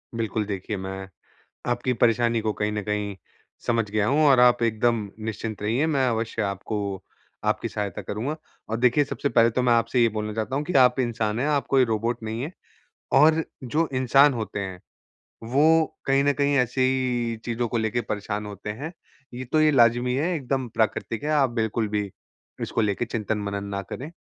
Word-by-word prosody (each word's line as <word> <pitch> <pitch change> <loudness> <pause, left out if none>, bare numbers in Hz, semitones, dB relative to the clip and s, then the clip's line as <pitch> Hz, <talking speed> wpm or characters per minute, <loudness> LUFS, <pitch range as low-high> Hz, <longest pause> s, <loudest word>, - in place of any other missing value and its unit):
बिल्कुल 110 -1 -1
देखिए 100 +1 -4
मैं 95 0 -6 0.6
आपकी 120 +1 0
परेशानी 115 0 +2
को 110 0 -1
कहीं 105 0 -2
न 105 0 -2
कहीं, 105 -1 -3 0.5
समझ 115 -3 +1
गया 105 0 +1
हूँ 150 +3 +3
और 130 -3 +6
आप 125 -1 +5
एकदम 115 -1 +1 0.2
निश्चिंत 110 -1 -4
रहिए 120 +9 +1
मैं 140 -5 +1
अवश्य 115 -1 -2
आपको 100 +2 -3 0.7
आपकी - - 0
सहायता 100 -3 -4
करूँगा। 125 +9 -3 0.3
और 115 - -1
देखिए 125 +4 +3
सबसे 140 - -2
पहले 115 -3 +4
तो 125 +2 0
मैं 125 - +3
आपसे 115 +1 +2
ये 115 - +5
बोलना 105 0 -4
चाहता 110 +5 -2
हूँ 145 - -1
कि 180 - -4
आप 125 0 +5
इंसान 115 -3 -1
हैं, 140 - +1
आप 145 -2 +1
कोई 135 -1 +4
रोबोट 115 +1 -1
नहीं 110 +2 -4
हैं। 155 - -5 0.6
और 155 +4 +5 0.2
जो 155 +6 0
इंसान 135 +3 +5
होते 110 -3 -4
हैं, 95 -2 -5 0.6
वो 155 +7 +4 0.2
कहीं 135 0 +3
न 145 - +3
कहीं 140 0 +1
ऐसी 125 +1 +1
ही 125 -3 +1
चीज़ 120 0 -3
को 120 0 -1
लेके 110 +2 0
परेशान 105 -1 -4
होते 105 0 -7
हैं। 140 +10 -5 0.4
ये 125 +1 -6
तो 155 - +4
ये 155 - +5
लाजमी 120 -1 +4
है, 160 +7 0
एकदम 130 -3 -2
प्राकृतिक 110 +3 -1
है। 150 - -2
आप 140 -4 +3
बिल्कुल 110 -1 -1
भी 105 -1 -1 0.5
इसको 115 - -1
लेके 105 +3 0
चिंतन 110 -2 -2
मनन 100 0 -3
ना 100 - -2
करें। 135 - -7
115 Hz, 190 wpm, -25 LUFS, 105-130 Hz, 0.7 s, और